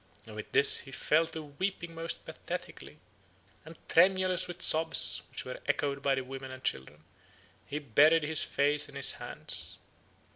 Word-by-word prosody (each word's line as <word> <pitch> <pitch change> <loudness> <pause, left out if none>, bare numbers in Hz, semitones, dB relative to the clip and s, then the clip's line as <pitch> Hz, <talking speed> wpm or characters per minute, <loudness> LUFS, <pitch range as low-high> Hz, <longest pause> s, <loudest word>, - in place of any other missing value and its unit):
And 110 - -12
with 110 - -9
this 140 - +7
he 135 - -10
fell 155 +4 +1
to 160 -1 -7
weeping 170 +3 -5
most 165 0 -3
pathetically, - - -8 0.7
and, 160 +1 -13
tremulous 185 0 +3
with 175 +1 -6
sobs, 160 +1 +3
which - - -6
were - - -7
echoed 140 -1 -1
by 140 -1 +1
the 130 - -3
women 135 +1 -9
and 130 0 -11
children, 75 - -4 0.6
he 145 - -5
buried 150 +4 +3
his 155 +1 -2
face 145 +1 0
in - - -14
his - - +4
hands. - - -5
150 Hz, 160 wpm, -29 LUFS, 135-165 Hz, 0.7 s, this